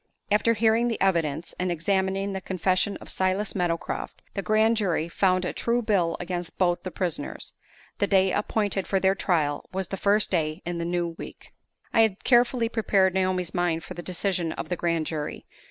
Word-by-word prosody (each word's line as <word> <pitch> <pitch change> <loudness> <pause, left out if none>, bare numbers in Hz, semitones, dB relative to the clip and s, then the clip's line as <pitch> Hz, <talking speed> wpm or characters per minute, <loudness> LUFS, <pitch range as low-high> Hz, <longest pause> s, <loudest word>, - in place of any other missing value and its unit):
After 215 +3 +3
hearing 225 +2 +3
the 230 - -2
evidence, 165 -4 0
and 180 0 0
examining 195 +3 0
the 190 - -4
confession 185 +2 0
of - - -9
Silas 190 +3 0
Meadowcroft, 175 -4 -3
the 200 - -2
grand 220 +3 +3
jury 175 -6 0
found 185 +1 +1
a - - -2
true 235 +1 0
bill 180 -6 +1
against 175 -1 -5
both 175 -2 +2
the 185 - -5
prisoners. 175 -6 -4 0.5
The 200 - +2
day 190 -1 +4
appointed 205 -1 -1
for 195 - +1
their 190 0 +3
trial 160 -7 0
was 190 -1 -3
the 195 - -3
first 205 +2 +2
day 155 -4 -1
in 175 0 -3
the 170 - -2
new 175 0 -1
week. - - -10 0.4
I 225 - +5
had 215 -3 +1
carefully 240 -1 +4
prepared 200 -5 +2
Naomi's 185 -2 0
mind 175 -2 0
for - - -8
the 175 - -7
decision 175 -2 -1
of - - -6
the 180 - 0
grand 165 -2 0
jury. 150 -1 -4
185 Hz, 185 wpm, -26 LUFS, 175-205 Hz, 0.5 s, I